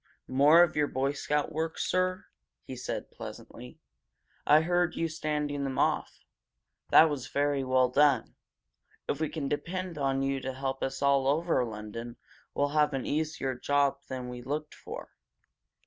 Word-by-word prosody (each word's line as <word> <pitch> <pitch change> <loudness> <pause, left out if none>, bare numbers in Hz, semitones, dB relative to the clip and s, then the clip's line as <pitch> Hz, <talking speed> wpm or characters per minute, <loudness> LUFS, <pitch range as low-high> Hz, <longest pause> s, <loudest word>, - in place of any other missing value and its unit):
"More 145 +6 +6
of 170 - 0
your 150 -1 +2
Boy 135 +1 0
Scout 150 +1 -1
work, 160 +1 -3
sir?" 185 0 0 0.4
he 130 - -8
said, 125 - -5
pleasantly. 60 - -10 0.7
"I 150 +1 +7
heard 175 +1 +1
you 165 - 0
standing 150 -3 -2
them 135 -1 -3
off! - - 0 0.6
That 160 - +8
was 140 -4 -4
very 140 0 0
well 130 -1 +3
done. 140 -1 +3 0.7
If 145 - -1
we 155 - 0
can 150 -4 -4
depend 175 +3 -3
on 135 -1 0
you 135 0 0
to 130 0 -4
help 135 0 -3
us 135 +1 -3
all 140 -1 +3
over 155 -1 +2
London, 115 +1 -7 0.4
we'll 145 0 +1
have 150 -1 +2
an 135 - -3
easier 150 -3 -1
job 140 +2 +1
than 130 -1 -5
we 125 0 -7
looked 150 +4 -4
for." - - -9
145 Hz, 160 wpm, -29 LUFS, 130-155 Hz, 0.7 s, That